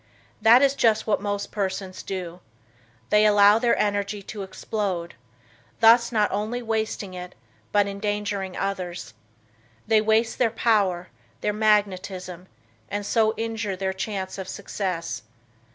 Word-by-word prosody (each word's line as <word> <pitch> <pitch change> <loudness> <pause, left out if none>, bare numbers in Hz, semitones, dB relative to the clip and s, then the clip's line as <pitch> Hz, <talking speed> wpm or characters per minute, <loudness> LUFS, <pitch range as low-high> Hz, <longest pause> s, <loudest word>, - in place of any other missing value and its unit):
That 230 +5 +7
is 275 -1 +4
just 220 -5 +2
what 210 -3 +1
most 205 0 -3
persons 190 -2 -3
do. 180 -2 -6 0.7
They 210 0 +5
allow 205 0 +6
their 240 0 +2
energy 205 0 -1
to 205 +1 -7
explode, 190 -2 -3 0.7
thus 235 +1 +6
not 210 -3 +2
only 215 +5 -2
wasting 220 -3 -2
it 180 0 -8 0.4
but 205 -1 +4
endangering 200 -1 -3
others. 185 - -4 0.7
They 220 -1 +4
waste 220 +1 +1
their 245 - +4
power, 205 -6 +1 0.3
their 210 - 0
magnetism 190 -4 0 0.4
and 205 0 -3
so 220 0 +2
injure 225 -3 -3
their 190 0 -2
chance 190 -1 -4
of 190 - -6
success. 180 -5 -4
205 Hz, 130 wpm, -24 LUFS, 190-220 Hz, 0.7 s, That